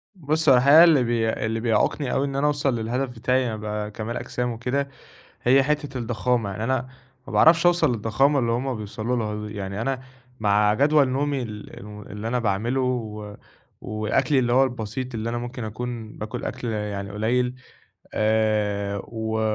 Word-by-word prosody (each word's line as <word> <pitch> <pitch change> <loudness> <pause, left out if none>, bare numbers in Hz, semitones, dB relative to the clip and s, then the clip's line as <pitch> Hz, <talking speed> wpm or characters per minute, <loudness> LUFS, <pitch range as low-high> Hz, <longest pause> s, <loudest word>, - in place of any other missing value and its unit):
بُصّ، 155 -2 +1
هو 130 - +8
الحقيقة 140 +6 +8
اللي 160 -7 +5
بي 115 -2 +1
اللي 110 0 -2
بيعوقني 115 +4 +1
أوي 135 - +1
إن 135 -1 -4
أنا 140 +2 +2
أوصل 145 -3 +1
للهدف 125 +4 -2
بتاعي 130 +3 +1
إني 115 - -2
ابقى 105 0 -4
كمال 110 +3 -4
أجسام 125 0 -3
وكده 125 +4 -2 0.5
هي 135 +3 +5
حتّة 145 -1 -1
الضخامة، 115 -2 -1
يعني 100 +3 -4
أنا 130 +1 0 0.4
ما - - -8
باعرفش 165 +1 +5
أوصل 175 -6 +4
للضخامة 120 +6 +2
اللي 120 -2 0
هُم 125 +2 -1
بيوصلوا 110 +3 -3
لها 105 -1 -3
دي، 105 - -8
يعني 100 +1 -4
أنا 130 +1 -2 0.4
مع 105 0 +3
جدول 145 +3 +4
نومي 140 +1 0
ال 105 -3 -8
الم 105 +1 -10
اللي 105 +2 -7
أنا 125 +2 0
باعمله، 115 +4 0
و 105 -5 -3 0.5
وأكلي 115 +6 +1
اللي 120 -1 +1
هو 130 +2 +6
البسيط، 125 0 -4
اللي 115 +1 -2
أنا 120 - -2
ممكن 120 0 -5
أكون 110 0 -5
باكل 110 +3 -5
أكْل 120 - -4
يعني 105 -2 -3
قليل، 125 +4 0 0.6
آآ، 105 -2 +1
و 110 -1 -3
120 Hz, 175 wpm, -24 LUFS, 110-130 Hz, 0.6 s, هو